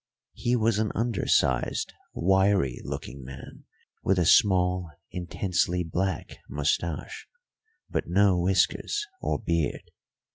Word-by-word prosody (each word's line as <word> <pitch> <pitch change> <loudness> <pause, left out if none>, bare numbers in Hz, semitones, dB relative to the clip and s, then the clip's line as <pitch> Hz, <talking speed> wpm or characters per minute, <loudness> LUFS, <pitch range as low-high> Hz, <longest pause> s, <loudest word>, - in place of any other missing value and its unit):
He 120 0 0
was 110 -2 +2
an 110 -1 0
undersized, 100 - +1 0.2
wiry 95 -6 +2
looking 65 +2 -6
man 65 +1 -11 0.4
with 95 - +2
a 90 - +2
small, 90 -1 +4 0.2
intensely 90 0 -1
black 90 +1 -3
moustache, 75 +2 -2 0.6
but - - -2
no 95 +1 +4
whiskers 95 - +1 0.2
or - - 0
beard. 85 -8 -2
90 Hz, 105 wpm, -27 LUFS, 85-100 Hz, 0.6 s, small